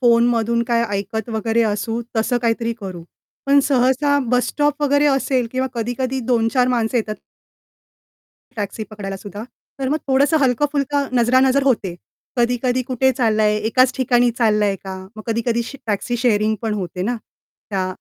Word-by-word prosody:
फोनमधून 235 Hz, -1 st, +3 dB
काही 235 Hz, -1 st, +2 dB
ऐकत 220 Hz, +3 st, -4 dB
वगैरे 225 Hz, +1 st, +1 dB
असू 225 Hz, +2 st, -1 dB, 0.2 s
तसं 225 Hz, +2 st, +1 dB
काहीतरी 230 Hz, 0 st, 0 dB
करू. 185 Hz, -4 st, -7 dB, 0.4 s
पण 280 Hz, +1 st, +5 dB
सहसा 270 Hz, +2 st, +2 dB
बसस्टॉप 290 Hz, +4 st, +1 dB
वगैरे 285 Hz, 0 st, +3 dB
असेल 270 Hz, -3 st, +1 dB
किंवा 260 Hz, 0 st, 0 dB
कधी-कधी 245 Hz, +3 st, -2 dB
2-4 245 Hz, +2 st, +2 dB
माणसं 240 Hz, -1 st, 0 dB
येतात 215 Hz, -2 st, -1 dB, 1.4 s
टॅक्सी 210 Hz, +1 st, -4 dB
पकडायलासुद्धा. 205 Hz, -1 st, -7 dB, 0.4 s
तर 265 Hz, -, -1 dB
मग 295 Hz, -, +1 dB
थोडंसं 280 Hz, +4 st, +3 dB
हलकं-फुलकं 280 Hz, +2 st, +1 dB
नजरानजर 260 Hz, +3 st, +4 dB
होते. 220 Hz, -10 st, +1 dB, 0.4 s
कधी-कधी 245 Hz, +1 st, +1 dB
कुठे 260 Hz, +1 st, +1 dB
चाललाय, 215 Hz, -4 st, +2 dB
एकाच 255 Hz, +3 st, +3 dB
ठिकाणी 245 Hz, -1 st, +3 dB
चाललाय 210 Hz, -3 st, +2 dB
का? 190 Hz, -1 st, -5 dB, 0.2 s
मग 215 Hz, -, -8 dB
कधी-कधी 230 Hz, +1 st, 0 dB
श 275 Hz, -, -9 dB
टॅक्सी 220 Hz, +3 st, -1 dB
शेअरिंग 220 Hz, -3 st, +2 dB
पण 220 Hz, -2 st, -1 dB
होते 180 Hz, -2 st, -4 dB
ना, 240 Hz, +5 st, -1 dB, 0.5 s
त्या 190 Hz, -2 st, -1 dB
235 Hz, 140 wpm, -20 LUFS, 220-260 Hz, 1.4 s, पण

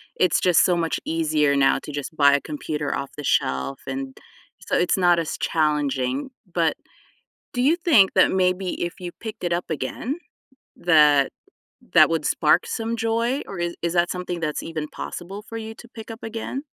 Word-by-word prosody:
it's 185 Hz, -, +3 dB
just 180 Hz, -3 st, +4 dB
so 180 Hz, -, +3 dB
much 165 Hz, -1 st, -1 dB
easier 155 Hz, -3 st, +1 dB
now 135 Hz, -1 st, +3 dB
to -, -, -7 dB
just 145 Hz, +2 st, -5 dB
buy 140 Hz, -2 st, +5 dB
a 140 Hz, -, +2 dB
computer 150 Hz, -1 st, -3 dB
off 140 Hz, 0 st, -4 dB
the 150 Hz, -, -6 dB
shelf 65 Hz, -, 0 dB
and 135 Hz, 0 st, -5 dB, 0.5 s
so -, -, -1 dB
it's 180 Hz, -, +2 dB
not 175 Hz, -2 st, +4 dB
as 165 Hz, -, -3 dB
challenging, 145 Hz, -, 0 dB, 0.2 s
but, 165 Hz, -2 st, +2 dB, 0.8 s
do 245 Hz, -, -1 dB
you 290 Hz, +6 st, +4 dB
think 310 Hz, -, +4 dB
that -, -, +5 dB
maybe 185 Hz, 0 st, 0 dB
if 175 Hz, +4 st, -5 dB
you 175 Hz, -1 st, -6 dB
picked 220 Hz, -2 st, -7 dB
it 175 Hz, -1 st, 0 dB
up 175 Hz, -, -1 dB
again, 230 Hz, -, -3 dB, 0.6 s
that 150 Hz, -5 st, +4 dB, 0.6 s
that -, -, +7 dB
would -, -, 0 dB
spark -, -, +3 dB
some 230 Hz, 0 st, -2 dB
joy, 230 Hz, +4 st, 0 dB
or 195 Hz, -, -7 dB
is 170 Hz, 0 st, -2 dB
that 175 Hz, 0 st, +2 dB
something 180 Hz, -1 st, -4 dB
that's 155 Hz, -2 st, -2 dB
even 155 Hz, -2 st, -5 dB
possible 190 Hz, +4 st, -7 dB
for 225 Hz, -, -6 dB
you 220 Hz, 0 st, -6 dB
to 240 Hz, -, -13 dB
pick 225 Hz, -1 st, -10 dB
up 225 Hz, -, -9 dB
again? 225 Hz, +4 st, -5 dB
175 Hz, 180 wpm, -23 LUFS, 150-215 Hz, 0.8 s, that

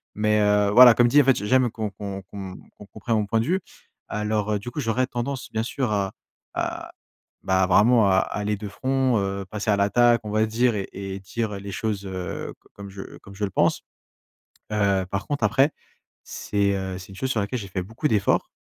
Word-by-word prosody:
mais, 105 Hz, 0 st, +2 dB
heu, 105 Hz, -1 st, +3 dB
voilà, 120 Hz, +1 st, +9 dB
comme 120 Hz, -, +5 dB
dit 145 Hz, +5 st, +6 dB
en -, -, -1 dB
fait, 135 Hz, -2 st, +5 dB
j 105 Hz, -, -4 dB
j'aime 130 Hz, +1 st, +3 dB
qu'on 110 Hz, -2 st, -4 dB
qu'on 100 Hz, -1 st, -7 dB
qu'on 95 Hz, -1 st, -8 dB
m -, -, -11 dB, 0.2 s
qu'on 105 Hz, -, -13 dB
comprenne 110 Hz, +3 st, -3 dB
mon 105 Hz, -, 0 dB
point 115 Hz, +2 st, +1 dB
de 115 Hz, -, 0 dB
vue. 185 Hz, +5 st, +1 dB, 0.5 s
Alors, 105 Hz, 0 st, -1 dB
heu, 105 Hz, -, 0 dB
du 120 Hz, +4 st, -7 dB
coup, -, -, -5 dB
j'aurais 125 Hz, 0 st, 0 dB
tendance 125 Hz, +1 st, -5 dB
bien 110 Hz, 0 st, -1 dB
sûr 125 Hz, 0 st, -2 dB
à 100 Hz, -2 st, 0 dB, 0.4 s
à -, -, -3 dB, 0.5 s
bah 95 Hz, 0 st, +2 dB
vraiment 110 Hz, +3 st, +5 dB
à 95 Hz, -, +4 dB
aller 105 Hz, +2 st, -2 dB
de 105 Hz, +1 st, -6 dB
front, 130 Hz, +3 st, 0 dB
heu, 100 Hz, 0 st, -3 dB
passer 105 Hz, +3 st, -5 dB
à 100 Hz, -, +2 dB
l'attaque 120 Hz, +4 st, +3 dB
on 105 Hz, -, -6 dB
va 110 Hz, +1 st, +2 dB
dire 115 Hz, +1 st, +1 dB
et 100 Hz, -2 st, -3 dB
et 95 Hz, 0 st, -6 dB
dire, 105 Hz, +3 st, -4 dB
heu, 100 Hz, -, -5 dB
les 100 Hz, 0 st, -7 dB
choses 105 Hz, 0 st, -3 dB
heu, 90 Hz, -2 st, -5 dB
c -, -, -24 dB
comme 100 Hz, 0 st, -10 dB
je 95 Hz, 0 st, -10 dB
comme 100 Hz, 0 st, -14 dB
je 105 Hz, -, -5 dB
le 100 Hz, -, -1 dB
pense. -, -, +1 dB, 0.9 s
Heu, 100 Hz, -2 st, +2 dB
par 100 Hz, +1 st, -3 dB
contre 145 Hz, 0 st, -1 dB
après, 135 Hz, +3 st, +3 dB, 0.6 s
c'est 100 Hz, -1 st, -1 dB
heu, 95 Hz, -1 st, -4 dB
c'est 95 Hz, +1 st, -12 dB
une 95 Hz, -, -11 dB
chose 130 Hz, +5 st, -3 dB
sur 120 Hz, -, 0 dB
laquelle 105 Hz, +5 st, -2 dB
j'ai 100 Hz, -, -7 dB
fait 95 Hz, 0 st, -3 dB
beaucoup 115 Hz, -, -3 dB
d'efforts. 105 Hz, -5 st, +1 dB
105 Hz, 230 wpm, -24 LUFS, 100-120 Hz, 0.9 s, voilà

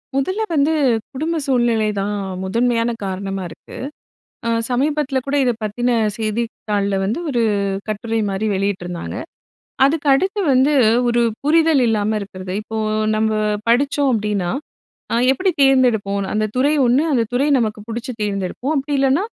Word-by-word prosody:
முதல்ல 375 Hz, +10 st, 0 dB
வந்து, 300 Hz, +1 st, +3 dB, 0.4 s
குடும்ப 315 Hz, +5 st, -2 dB
சூழ்நிலை 240 Hz, -4 st, +2 dB
தான் 205 Hz, +1 st, -1 dB, 0.3 s
முதன்மையான 230 Hz, +4 st, +1 dB
காரணமா 195 Hz, 0 st, -3 dB
இருக்கு. -, -, -12 dB, 0.7 s
அ -, -, +1 dB, 0.2 s
சமீபத்தில 280 Hz, +1 st, 0 dB
கூட 280 Hz, +1 st, 0 dB
இதை 245 Hz, -, +2 dB
பத்தின 240 Hz, +4 st, -1 dB, 0.3 s
செய்தித் 225 Hz, +1 st, -2 dB, 0.2 s
தாள்ல 200 Hz, -1 st, +1 dB
வந்து 210 Hz, +8 st, -1 dB
ஒரு 245 Hz, -5 st, +1 dB, 0.5 s
கட்டுரை 225 Hz, +1 st, -2 dB
மாதிரி 195 Hz, +3 st, -2 dB
வெளியிட்டிருந்தாங்க. 185 Hz, -3 st, -3 dB, 0.7 s
அதுக்கு 295 Hz, +1 st, 0 dB
அடுத்து 380 Hz, +9 st, 0 dB
வந்து, 265 Hz, +4 st, +4 dB, 0.4 s
ஒரு 240 Hz, 0 st, +2 dB, 0.2 s
புரிதல் 315 Hz, -1 st, +4 dB
இல்லாம 215 Hz, -2 st, +1 dB
இருக்கிறது. 185 Hz, -2 st, -7 dB
இப்போ 220 Hz, +1 st, -6 dB, 0.4 s
நம்ம 220 Hz, 0 st, +1 dB, 0.4 s
படிச்சோம் 280 Hz, +3 st, +2 dB
அப்படின்னா, 210 Hz, -5 st, -1 dB, 0.6 s
அ -, -, +1 dB, 0.2 s
எப்படி 370 Hz, +8 st, +1 dB
தேர்ந்தெடுப்போன்னு. 220 Hz, -8 st, +2 dB
அந்த 215 Hz, 0 st, +1 dB
துறை 285 Hz, +4 st, +3 dB
ஒண்ணு 250 Hz, +4 st, +3 dB
அந்த 245 Hz, -4 st, +3 dB
துறை 255 Hz, +4 st, +2 dB
நமக்கு 215 Hz, -3 st, -1 dB
பிடிச்சு 235 Hz, +2 st, -4 dB
தேர்ந்தெடுப்போம். 205 Hz, +8 st, -2 dB
அப்படி 285 Hz, +1 st, -1 dB
இல்லன்னா 275 Hz, +7 st, +2 dB
235 Hz, 135 wpm, -19 LUFS, 205-275 Hz, 0.7 s, வந்து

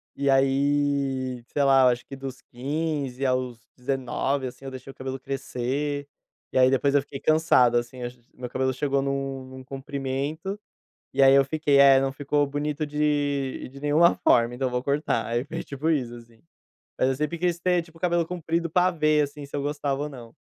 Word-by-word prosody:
E 140 Hz, 0 st, 0 dB
aí, 135 Hz, -2 st, +1 dB
sei 145 Hz, -, 0 dB
lá, 135 Hz, -1 st, +5 dB
eu -, -, +7 dB
acho 120 Hz, 0 st, -1 dB
que 135 Hz, -, -8 dB
dos 135 Hz, -1 st, -7 dB
15 140 Hz, 0 st, -3 dB
aos 125 Hz, -2 st, -2 dB
19, 135 Hz, +1 st, -1 dB
assim, 125 Hz, -, -11 dB
eu 135 Hz, -, -6 dB
deixei 130 Hz, 0 st, -9 dB
o -, -, -18 dB
cabelo 130 Hz, 0 st, -5 dB
crescer, 140 Hz, +2 st, -3 dB, 0.5 s
e -, -, 0 dB
aí 130 Hz, 0 st, +6 dB
depois 140 Hz, +2 st, +2 dB
eu 145 Hz, -, +5 dB
fiquei 135 Hz, 0 st, -9 dB
cansado, 155 Hz, -7 st, +4 dB
assim, 120 Hz, +1 st, -4 dB
ach 120 Hz, +1 st, -5 dB, 0.2 s
meu 125 Hz, -1 st, -7 dB
cabelo 130 Hz, +1 st, 0 dB
chegou 140 Hz, +1 st, 0 dB
num 135 Hz, -1 st, -3 dB
num 130 Hz, 0 st, -10 dB
comprimento, 140 Hz, +6 st, -4 dB, 0.6 s
e -, -, +2 dB
aí 135 Hz, 0 st, +8 dB
eu 140 Hz, 0 st, +6 dB
fiquei 145 Hz, 0 st, +2 dB
é 135 Hz, -1 st, +8 dB
não 135 Hz, 0 st, 0 dB
ficou 145 Hz, +1 st, 0 dB
bonito 145 Hz, +1 st, -2 dB
de 145 Hz, -3 st, -1 dB
de 140 Hz, -, -11 dB
nenhuma 150 Hz, +4 st, +4 dB
forma, 120 Hz, +1 st, +4 dB
então 130 Hz, +1 st, -1 dB
eu -, -, -9 dB
vou 125 Hz, 0 st, -1 dB
cortar, 140 Hz, -4 st, 0 dB
aí 120 Hz, +2 st, -1 dB
foi 145 Hz, -, -6 dB
tipo 140 Hz, +3 st, -3 dB
isso 125 Hz, -7 st, 0 dB
assim. 115 Hz, -1 st, -15 dB, 0.6 s
Mas 130 Hz, -, +3 dB
eu 135 Hz, -, +1 dB
sempre 150 Hz, +4 st, -2 dB
quis 175 Hz, 0 st, 0 dB
ter, 180 Hz, 0 st, +2 dB
tipo, 165 Hz, 0 st, -18 dB
o -, -, -16 dB
cabelo 175 Hz, -2 st, +1 dB
comprido 170 Hz, -1 st, -2 dB
pra 180 Hz, +3 st, +3 dB
ver, 155 Hz, -3 st, +2 dB
assim, 145 Hz, 0 st, -8 dB
se 140 Hz, -, -6 dB
eu 140 Hz, -, -2 dB
gostava 145 Hz, -1 st, -2 dB
ou 150 Hz, -, -3 dB
não. 120 Hz, -4 st, -11 dB
140 Hz, 200 wpm, -25 LUFS, 130-150 Hz, 0.6 s, aí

